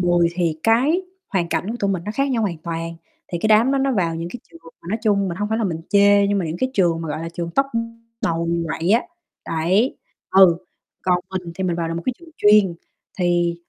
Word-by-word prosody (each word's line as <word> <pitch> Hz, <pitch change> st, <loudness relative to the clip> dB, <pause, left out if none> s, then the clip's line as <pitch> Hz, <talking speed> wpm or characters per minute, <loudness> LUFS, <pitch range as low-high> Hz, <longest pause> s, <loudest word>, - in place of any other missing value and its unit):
10 175 Hz, -1 st, +3 dB
thì 170 Hz, -3 st, 0 dB
cái 265 Hz, +11 st, +3 dB, 0.3 s
hoàn 175 Hz, -5 st, -1 dB
cảnh 170 Hz, +5 st, -1 dB
của 235 Hz, -, -3 dB
tụi 200 Hz, -, +1 dB
mình 180 Hz, -3 st, -2 dB
nó 210 Hz, -, -3 dB
khác 275 Hz, +2 st, 0 dB
nhau 235 Hz, -3 st, +1 dB
hoàn 175 Hz, -6 st, -2 dB
toàn, 165 Hz, 0 st, -5 dB, 0.4 s
thì 175 Hz, -, -1 dB
cái 215 Hz, -, 0 dB
đám 225 Hz, +5 st, +5 dB
đó 275 Hz, -, +2 dB
nó 270 Hz, 0 st, +1 dB
vào 175 Hz, -7 st, 0 dB
những 165 Hz, +1 st, -4 dB
cái 245 Hz, +6 st, -8 dB
trường 165 Hz, 0 st, -15 dB, 0.2 s
mà -, -, -10 dB
nói 215 Hz, +4 st, -1 dB
chung 200 Hz, -3 st, +2 dB
mình 170 Hz, -, -4 dB
hông 205 Hz, +2 st, -2 dB
phải 220 Hz, +1 st, 0 dB
là 225 Hz, -, 0 dB
mình 165 Hz, -4 st, -2 dB
chê 200 Hz, 0 st, +5 dB
nhưng 200 Hz, 0 st, +1 dB
mà 185 Hz, -, -1 dB
những 160 Hz, +1 st, -3 dB
cái 260 Hz, -, 0 dB
trường 170 Hz, -4 st, +2 dB
mà, 160 Hz, -, -5 dB
gọi 150 Hz, +1 st, -3 dB
là, 165 Hz, -, -4 dB
trường 170 Hz, 0 st, -5 dB
top, 275 Hz, -, +3 dB
ưm, 230 Hz, 0 st, -4 dB, 0.2 s
đầu 165 Hz, 0 st, 0 dB, 0.2 s
quậy 165 Hz, +3 st, -2 dB
á, 230 Hz, +3 st, +4 dB, 0.4 s
đấy, 180 Hz, -, +1 dB, 0.3 s
ừ, 190 Hz, -3 st, +7 dB, 0.5 s
còn 180 Hz, -1 st, +2 dB
mình 180 Hz, -3 st, -5 dB
thì 190 Hz, -, -3 dB
mình 175 Hz, -2 st, 0 dB
vào 165 Hz, -1 st, -2 dB
được 165 Hz, -, -3 dB
một 170 Hz, -, -4 dB
cái 255 Hz, -, +2 dB
trường 340 Hz, -1 st, -15 dB
chuyên 210 Hz, -4 st, +5 dB, 0.4 s
thì 175 Hz, -1 st, +2 dB
185 Hz, 255 wpm, -21 LUFS, 170-215 Hz, 0.5 s, ừ